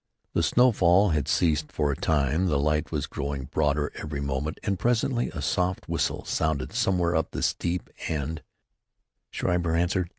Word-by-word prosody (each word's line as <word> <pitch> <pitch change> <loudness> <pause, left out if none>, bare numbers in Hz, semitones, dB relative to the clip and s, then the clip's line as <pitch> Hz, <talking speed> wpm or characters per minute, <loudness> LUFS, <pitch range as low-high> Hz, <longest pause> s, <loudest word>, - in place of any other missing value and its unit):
The - - +2
snowfall 100 0 +4
had 75 -3 0
ceased 80 -1 +1
for 75 -2 0
a - - -2
time. 75 +5 +1
The 75 -5 +2
light 75 +1 0
was - - -1
growing 70 -1 -4
broader 75 +2 0
every 75 -2 -5
moment, 70 +2 -2
and 100 -3 -1
presently 120 +1 +1
a 75 -4 -6
soft 90 +4 0
whistle - - -1
sounded 80 -5 -1
somewhere 90 -2 +1
up 80 - +1
the - - -4
steep, 85 +1 -1 0.2
and 80 +1 -3 0.9
Schreiber 85 -2 0
answered. 90 +1 +1
80 Hz, 160 wpm, -26 LUFS, 75-90 Hz, 0.9 s, snowfall